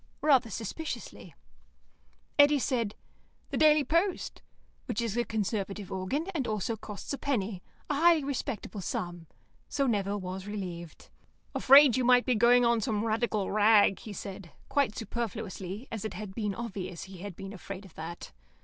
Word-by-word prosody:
rather 270 -6 +4
suspiciously. 230 - -6 1.0
Eddy 290 0 +7
said, 240 -6 -1 0.6
"The - - -1
Daily 305 -1 +6
Post," 335 +7 0 0.5
which - - -2
is 230 -3 -1
a 240 - +2
Conservative 205 -3 -3
organ, 190 - -2
and 280 -7 -1
also 215 +1 -1
costs 210 +3 -7
a 280 - -4
penny, 210 -9 -1 0.3
a - - 0
highly 325 +1 +5
respectable 265 -6 -4
sum, 175 -2 -4 0.4
so 275 - 0
Nevill 205 -4 0
was 185 +1 -6
relieved. 180 -5 -6 0.4
"Afraid 275 -2 +7
you 255 - +1
might 245 0 +5
be 255 - +3
going 240 +2 +5
on 235 -1 +3
some 215 -2 -1
Radical 220 -2 0
rag," 210 -1 +5
he 215 - -9
said, 195 -2 -7 0.2
quite 275 -6 +1
superfluously, 215 -2 -5
as 220 -3 -4
it 220 - -4
had 200 0 -6
been 210 -3 -2
obvious 195 -7 -5
he 190 -1 -11
had 200 -1 -7
been 195 +2 -8
afraid 195 0 -8
of 185 - -15
that. 165 +2 -7
215 Hz, 160 wpm, -30 LUFS, 195-250 Hz, 1.0 s, Eddy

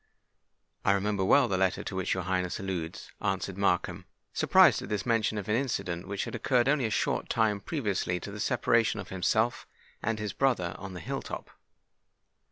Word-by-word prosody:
"I 100 - +4
remember 100 0 0
well 130 +7 +5
the 95 -4 0
letter 95 -1 +1
to 95 - -5
which 95 0 0
your 95 - -2
Highness 90 0 -1
alludes," 90 -4 -5
answered 95 -1 -1
Markham, 95 -3 0 0.3
surprised - - +5
at - - -7
this 105 -2 -2
mention 115 -2 +1
of 100 - -4
an 105 - +2
incident 100 -10 -2
which 100 0 -2
had - - -7
occurred 120 +2 +2
only 140 -3 +2
a - - 0
short 105 - -1
time 110 -3 +2
previously 100 - -1
to 100 - -7
the 105 - -7
separation 115 +1 +2
of 95 - -7
himself 110 +6 0 0.3
and 115 0 -1
his 105 -2 -3
brother 120 -11 +1
on 95 -2 -7
the 90 - -6
hill - - -3
top. - - -7
100 Hz, 185 wpm, -29 LUFS, 95-115 Hz, 0.3 s, well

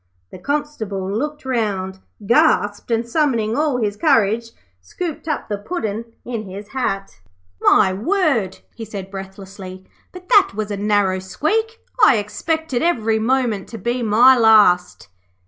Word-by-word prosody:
The - - -10
Constable 220 -7 -3
looked 295 +4 -4
round, 200 -7 -2 0.3
gasped, 220 -5 +2
and 230 0 0
summoning 235 -6 0
all 295 -3 +1
his 210 -4 -1
courage, 230 -5 +2 0.3
scooped 320 - -6
up 305 - -3
the 205 -1 -3
Puddin' 220 - -4 0.2
in 230 -3 -5
his 200 +2 -9
hat. 195 - -3 0.4
'My 190 -2 +4
word,' 235 - 0 0.2
he 230 - -8
said, 195 -3 -8
breathlessly, 190 -1 -9 0.3
'but 365 0 -12
that 395 - +5
was 215 0 -3
a 205 - -3
narrow 205 -2 +1
squeak. 435 - -2 0.3
I 275 - +7
expected 275 +6 -2
every 225 -10 +1
moment 230 -4 0
to 225 - -7
be 240 +2 -2
my 235 +4 +6
last.' 210 - +4
220 Hz, 140 wpm, -20 LUFS, 200-275 Hz, 0.4 s, I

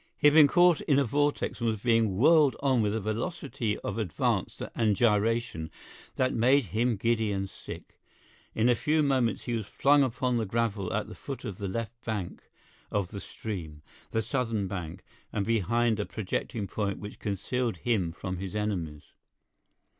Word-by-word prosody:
He - - -2
had 150 - +8
been 155 -2 +8
caught 175 +1 +4
in 140 - +2
a 140 - +4
vortex 145 +4 0
and 115 - +2
was 110 -2 -2
being 115 -4 +2
whirled 150 +2 +5
on 130 -4 +2
with 105 0 0
a - - 0
velocity 110 - -2
of - - -3
advance 90 -8 -1
and 110 -3 +2
gyration 110 -5 +1 0.5
that 130 0 +1
made 130 +3 +4
him 120 +2 +2
giddy 110 0 +1
and 95 -1 -2
sick. - - -11 0.6
In 120 +3 +4
few 155 +5 +1
moments 130 -6 +1
he 120 - -3
was 110 -3 -2
flung 145 +1 +4
upon 125 -1 0
the 115 - 0
gravel 105 -3 -1
at - - -1
the - - -9
foot 130 -2 -7
of 100 -5 -6
the 100 - -3
left 115 +4 -5
bank 105 -6 -4 0.5
of 100 -3 -1
the 100 - -6
stream—the 85 +2 -6
southern 115 -4 -1
bank—and 90 +3 -6
behind 115 +1 +1
a 105 - -1
projecting 110 +1 -3
point 100 -1 -2
which 105 0 -9
concealed 105 +2 -2
him 95 -4 0
from 90 +2 -5
his 95 +2 -6
enemies. 90 -8 -2
110 Hz, 170 wpm, -29 LUFS, 100-125 Hz, 0.6 s, had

